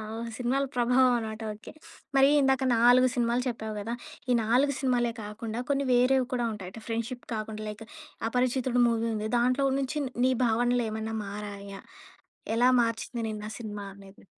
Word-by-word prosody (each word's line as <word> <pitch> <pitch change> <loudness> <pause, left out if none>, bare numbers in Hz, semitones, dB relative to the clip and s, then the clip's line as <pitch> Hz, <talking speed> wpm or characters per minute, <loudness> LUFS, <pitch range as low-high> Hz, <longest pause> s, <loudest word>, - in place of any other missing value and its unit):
ఓహ్! 235 +1 -5
సినిమాల 260 +3 0
ప్రభావం 250 +1 +4
అనమాట 220 0 -6
ఓకే. 210 - -12 0.4
మరి 270 +1 +6
ఇందాక 265 -1 +2
4 245 +2 +6
సినిమాలు 240 0 +1
చెప్పావు 220 -3 -4
గదా! 225 +3 -4 0.4
ఈ - - +4
4 255 +6 +3
సినిమాలే 245 -3 +1
కాకుండా 220 +2 -5
కొన్ని 280 0 +1
వేరేవి 250 +1 +3
కూడా 240 -1 0
ఉంటాయట. 190 0 -8
ఫ్రెండ్‌షిప్ 230 +2 -4
కాకుండా 215 0 -4
లైక్ 210 +1 -8 0.5
'అపరిచితుడు' 250 0 +1
మూవీ 230 -1 0
ఉంది. 215 0 -3
దాంట్లో 255 +3 +2
నుంచి 275 +3 -2 0.3
నీ 260 - +4
భావనలు 240 +2 +2
ఏమన్నా 220 +1 -4
మారాయా? 200 -1 -7 0.7
ఎలా 245 +2 +5
మార్చింది 230 +1 -2
నిన్నా 210 -1 -5
సినిమా 210 -3 -6
అనేది? 195 0 -16
235 Hz, 150 wpm, -28 LUFS, 220-250 Hz, 0.7 s, మరి